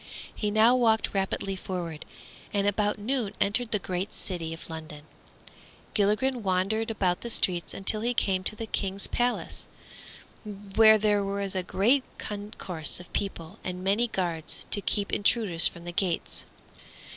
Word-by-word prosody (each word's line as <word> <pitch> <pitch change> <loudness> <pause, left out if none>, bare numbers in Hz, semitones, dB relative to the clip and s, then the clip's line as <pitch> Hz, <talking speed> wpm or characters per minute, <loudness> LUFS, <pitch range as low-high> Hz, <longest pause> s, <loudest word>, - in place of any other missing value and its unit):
He 210 - -2
now 220 +4 +5
walked 225 -3 +2
rapidly 195 0 -1
forward, 175 -4 -5 0.5
and 200 -1 +1
about 205 +1 +1
noon 225 0 -2
entered 225 +4 +2
the 215 - +3
great 185 +1 -4
city 170 -4 -4
of 165 - -8
London. 155 -2 -8 0.9
Gilligren 230 +5 +2
wandered 195 +3 0
about 185 -5 0
the 235 - -5
streets 180 -6 +1
until 210 +2 +2
he 240 +2 0
came 190 -4 +1
to 215 - +4
the 225 - -5
King's 195 -2 -2
palace, 245 0 -1 0.8
where 210 +1 +4
there 205 -1 +2
was 200 0 -2
a 190 - 0
great 225 +9 +2
concourse 200 -7 -4
of 180 - -13
people 170 -5 -4
and 180 0 -5
many 205 +5 +2
guards 170 -7 -2
to 205 - 0
keep 200 0 0
intruders 200 -5 +4
from 170 -1 -7
the 175 - -4
gates. 175 -1 -2
200 Hz, 150 wpm, -27 LUFS, 185-220 Hz, 0.9 s, now